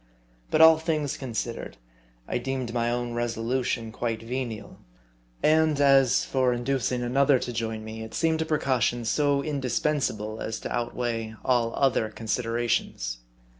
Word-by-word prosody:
But - - +3
all 160 0 +8
things 155 -3 -1
considered, 120 -2 -5 0.5
I - - -1
deemed 130 -2 -3
my 120 -1 +1
own 120 0 -2
resolution 120 0 -1
quite 115 -1 -3
venial; 120 -2 -5 0.6
and 155 -1 +4
as 135 -3 +5
for 130 -2 +1
inducing 125 0 -1
another 135 +3 +3
to 120 0 -4
join 110 -1 -3
me, 110 0 -7
it 110 0 -8
seemed 160 -1 +1
a - - 0
precaution 125 -6 0
'so 140 +3 +2
indispensable, 130 -6 -1
as 110 0 -3
to - - -3
outweigh 115 -2 -2
all 120 -2 +2
other 130 -5 +2
considerations. 115 - -2
120 Hz, 135 wpm, -26 LUFS, 115-135 Hz, 0.6 s, all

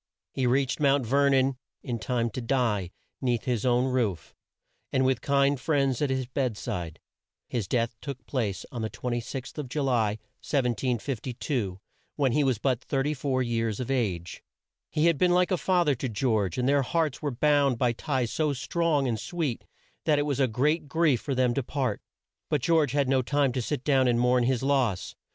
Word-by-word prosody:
He 130 -2 0
reached 130 +3 +1
Mount 140 -3 +3
Ver 140 +4 +3
non 135 -1 +2 0.3
in 120 -2 -3
time 120 0 -1
to 130 - -4
die 115 -7 0 0.3
'neath 120 -4 0
his 125 -2 -1
own 125 +1 +3
roof, 120 -9 -1 0.6
and 130 0 +2
with 130 -2 +1
kind 140 -1 +2
friends 135 -3 +1
at 145 - +1
his 130 -1 -1
bed 125 -3 -2
side. 90 -10 -5 0.5
His 115 -6 -2
death 115 +1 0
took 140 -3 -7
place 110 -8 -2
on 120 - -5
the 110 - -2
26th 125 +4 -5
of 140 -4 -5
Ju 145 +2 -1
ly, 115 -5 +1 0.2
1752, 125 - -2 0.4
when 140 -4 +2
he 150 +4 +2
was 130 -4 +2
but 125 +1 0
34 135 -1 0
years 115 -3 -1
of 125 +1 -3
age. 95 - -2 0.5
He 150 - +1
had 170 -4 +3
been 180 -1 +4
like 180 +1 +3
a - - +4
fa 180 0 +2
ther 145 - +3
to 130 0 -3
George, 110 -5 0
and 125 0 +1
their 140 0 +4
hearts 155 +1 -1
were 150 - -1
bound 140 0 +2
by 120 0 +2
ties 130 -2 -2
so 150 -2 0
strong 150 +1 0
and 115 -3 -1
sweet 160 -9 -3 0.4
that 150 -2 +3
it 145 - +2
was 140 -3 -1
a 135 - +4
great 145 +7 0
grief 155 -4 +2
for 140 - -2
them 125 -1 +2
to 140 - 0
part. 130 -4 -2 0.5
But 150 - +1
George 155 -5 +3
had 140 -2 +2
no 135 0 +3
time 140 +1 +1
to 125 0 -2
sit 135 +2 -3
down 135 -3 +3
and 120 -1 +2
mourn 125 0 +3
his 130 0 0
loss. 130 -9 +1
130 Hz, 195 wpm, -27 LUFS, 120-140 Hz, 0.6 s, been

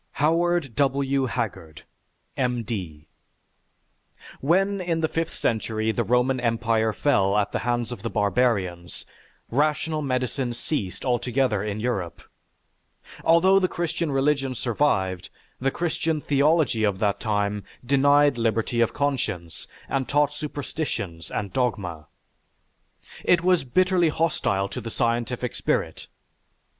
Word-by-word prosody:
HOWARD 165 -3 +1
W. 135 0 +1
HAGGARD, 100 - -4 0.5
M. 125 -2 0
D. 90 -10 -5 1.3
When 195 +6 +2
in 165 -2 -1
the 160 - +2
fifth 165 +1 -3
century 110 -1 0
the 120 - -1
Roman 125 +2 +2
Empire 115 -2 +1
fell 105 -6 +2
at 105 -1 +1
the - - -1
hands 120 0 -1
of 120 - -6
the 115 - -3
barbarians, 100 -6 0 0.5
rational 155 +3 +1
medicine 130 -2 -1
ceased 100 - -3
altogether 125 -3 +1
in 105 0 -3
Europe. 100 -8 -3 1.0
Although 185 +4 +5
the 185 - +2
Christian 170 -2 -2
religion 135 -1 +1
survived, 95 -8 0 0.3
the 135 - +1
Christian 160 0 -1
theology 145 -4 +2
of 100 -3 +1
that 100 -1 0
time 105 -2 -1 0.2
denied 140 0 +4
liberty 115 +1 0
of 115 - +2
conscience 110 - -2 0.2
and 135 -2 -2
taught 145 0 +2
superstitions 140 - -5
and 100 -3 -4
dogma. 90 - -2 1.2
It 175 -1 +3
was 180 -4 +3
bitterly 180 +5 +2
hostile 150 -12 0
to 100 - -5
the 115 - -6
scientific 120 +1 -1
spirit. - - -2
125 Hz, 120 wpm, -25 LUFS, 110-145 Hz, 1.3 s, Although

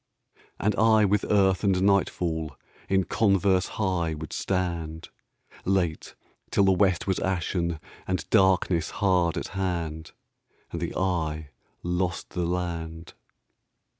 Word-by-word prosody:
And 105 +1 +1
I 110 -1 +5
with 105 +1 +1
earth 95 -2 +3
and 95 -2 +3
nightfall 85 -6 +1 0.3
In 95 0 +3
converse 95 -2 +2
high 90 -6 0
would 75 -1 -7
stand, 85 -4 -2 0.5
Late, 90 -4 -1 0.3
till 100 - +3
the 95 - +5
west 95 -2 +2
was 95 -2 0
ashen 85 -2 -1 0.3
And 95 0 -2
darkness 95 -4 +3
hard 90 -4 +1
at - - -4
hand, 85 -5 -3 0.6
And 85 - -4
the 85 - -3
eye 80 -5 -1 0.3
lost 90 0 -2
the 90 -2 -1
land. 85 -2 -4
90 Hz, 120 wpm, -26 LUFS, 85-95 Hz, 0.6 s, I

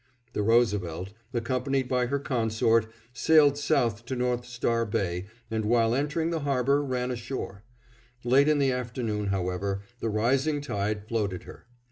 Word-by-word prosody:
The - - -1
Roosevelt, 100 -6 +1 0.2
accompanied 130 +2 -1
by 125 -1 +1
her 140 +3 0
consort, 115 -4 +1 0.3
sailed 145 +3 +5
south 120 -7 +1
to 130 - -3
North 125 -1 -1
Star 120 -1 0
Bay 95 -4 -2 0.2
and 110 -1 -1
while 115 +1 +3
entering 150 +5 0
the 165 - -1
harbor 140 0 +2
ran 125 -2 -2
ashore. 120 -5 -5 0.6
Late 130 +4 +4
in 155 -1 +4
the 135 -2 +3
afternoon, 115 -4 -2
however, 95 +1 -2 0.2
the 115 - -1
rising 135 +8 +1
tide 105 -5 -3
floated 100 -6 -2
her. - - -13
120 Hz, 145 wpm, -27 LUFS, 105-135 Hz, 0.6 s, sailed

